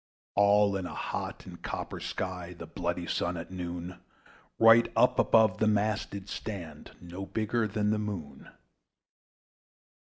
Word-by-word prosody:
All 100 0 +4
in 95 -2 -3
a - - -8
hot - - -4
and - - -11
copper - - -5
sky, 90 -2 -4
The 85 - -7
bloody 85 +2 -3
Sun, 85 +1 -1
at 85 +2 -7
noon, 90 0 -5 0.6
Right 115 +1 +7
up - - +4
above 110 -4 +4
the 110 - +3
mast 105 0 +1
did 100 -1 -7
stand, 85 -8 -7
No 90 +3 -7
bigger 110 +1 0
than 105 0 0
the 110 - +1
Moon. 85 -10 -6
95 Hz, 140 wpm, -30 LUFS, 85-105 Hz, 0.6 s, Right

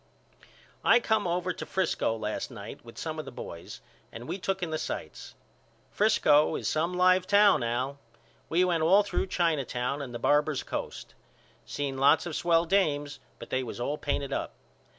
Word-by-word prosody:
I 235 - +6
come 220 -4 0
over 180 +1 -1
to - - -7
Frisco 160 -11 -1
last 105 -1 -3
night 110 -4 -9
with 115 0 -14
some 160 -1 -4
of 155 - -5
the - - -8
boys 85 -8 -9 0.3
and 120 +2 -9
we 195 - -4
took 190 0 -2
in 165 - -3
the 155 - -2
sights. - - -6 0.6
Frisco 155 -8 +3
is - - -3
some 165 +3 0
live 185 0 +4
town 205 -5 +5
Al. 125 +4 -2 0.5
We 175 +3 +3
went 170 -3 +1
all 190 +6 +5
through 200 - -2
China 165 -6 +1
Town 125 +3 -3
and 135 -3 -6
the 120 - -5
Barbers' 145 +3 +1
Coast. - - -6 0.5
Seen 140 -2 -3
lots 145 +5 +4
of 170 -3 -4
swell 170 -1 +2
dames 145 -6 0 0.2
but - - -11
they 130 - +1
was 120 -1 -7
all 140 +5 -2
painted 140 -1 -2
up. - - -3
155 Hz, 180 wpm, -28 LUFS, 135-180 Hz, 0.6 s, I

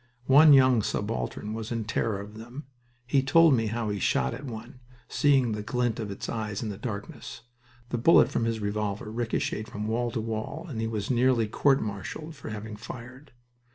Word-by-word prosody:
One 145 +4 +7
young 130 -4 +6
subaltern 100 - -3
was 110 +1 -5
in 115 -1 -1
terror 110 -2 -1
of 105 +1 -9
them. 120 +6 -9 0.4
He 135 +2 +2
told 165 +3 +5
me 115 -3 +1
how 110 -1 -2
he 100 - -3
shot 65 -6 +1
at 135 - -7
one, 120 0 -8 0.3
seeing 135 -4 +3
the 105 0 -3
glint 120 +1 -1
of 110 -2 -4
its 100 - -6
eyes 110 -2 -3
in 110 - -3
the 100 - -6
darkness. 110 0 -6 0.5
The 120 - -2
bullet 165 +9 +6
from 115 - 0
his 115 -1 -1
revolver 105 0 -3
ricocheted 115 -1 -2
from 105 -3 -5
wall 120 +2 0
to 115 0 -3
wall, 110 -1 -4
and 120 -8 -4
he 115 - -1
was 110 0 -3
nearly 125 -2 +3
court 135 +5 +2
martialed 105 - -6
for 130 - -8
having 105 0 -6
fired. 125 +5 -10
115 Hz, 190 wpm, -27 LUFS, 105-125 Hz, 0.5 s, One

